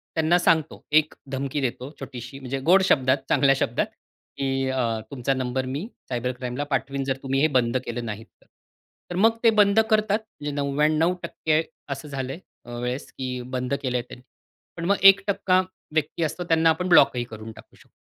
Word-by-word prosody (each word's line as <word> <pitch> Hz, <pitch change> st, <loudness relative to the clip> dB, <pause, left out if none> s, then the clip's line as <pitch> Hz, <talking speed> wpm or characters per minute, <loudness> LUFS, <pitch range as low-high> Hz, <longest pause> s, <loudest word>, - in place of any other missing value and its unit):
त्यांना 160 Hz, +2 st, +3 dB
सांगतो, 160 Hz, -3 st, +1 dB
एक 155 Hz, 0 st, +4 dB, 0.2 s
धमकी 140 Hz, +1 st, -2 dB
देतो 130 Hz, +2 st, -3 dB
छोटीशी, 130 Hz, -1 st, -8 dB
म्हणजे 135 Hz, 0 st, -4 dB
गोड 190 Hz, +2 st, +7 dB
शब्दात, 130 Hz, -5 st, +3 dB
चांगल्या 135 Hz, -1 st, +4 dB
शब्दात, 120 Hz, -3 st, 0 dB, 0.5 s
की 135 Hz, -1 st, -1 dB
अ, 120 Hz, -4 st, 0 dB
तुमचा 135 Hz, 0 st, -1 dB
नंबर 130 Hz, 0 st, -2 dB
मी 140 Hz, -, -4 dB, 0.2 s
सायबर 125 Hz, 0 st, -1 dB
क्राईमला 125 Hz, +2 st, -3 dB
पाठवीन, 135 Hz, 0 st, -1 dB
जर 135 Hz, -1 st, -1 dB
तुम्ही 135 Hz, 0 st, 0 dB
हे 155 Hz, -, +5 dB
बंद 120 Hz, 0 st, +1 dB
केले 120 Hz, +1 st, -4 dB
नाहीत 110 Hz, -1 st, -6 dB, 0.2 s
तर. -, -, -25 dB, 0.7 s
तर -, -, -3 dB
मग 225 Hz, +4 st, +3 dB
ते 230 Hz, -, +7 dB
बंद 200 Hz, +1 st, +4 dB
करतात. 215 Hz, -1 st, +2 dB, 0.2 s
म्हणजे 145 Hz, 0 st, -3 dB
99% 155 Hz, +3 st, +1 dB, 0.3 s
असं 140 Hz, +1 st, -5 dB
झालंय 135 Hz, +1 st, -5 dB, 0.3 s
अ, 120 Hz, -, -10 dB
वेळेस 125 Hz, +2 st, -4 dB
की 125 Hz, -1 st, -4 dB
बंद 125 Hz, +2 st, -2 dB
केलंय 125 Hz, -2 st, 0 dB
ते. -, -, -10 dB, 0.6 s
पण 170 Hz, -, -4 dB
मग 200 Hz, -, +3 dB
1% 195 Hz, -1 st, +5 dB, 0.3 s
व्यक्ती 155 Hz, +1 st, -1 dB
असतो, 160 Hz, +3 st, -2 dB
त्यांना 165 Hz, -1 st, +3 dB
आपण 170 Hz, +3 st, 0 dB
ब्लॉकही 130 Hz, -7 st, +5 dB
करून 110 Hz, -1 st, -9 dB
टाकू -, -, -16 dB
शकतो. -, -, -22 dB
140 Hz, 175 wpm, -24 LUFS, 125-160 Hz, 0.7 s, गोड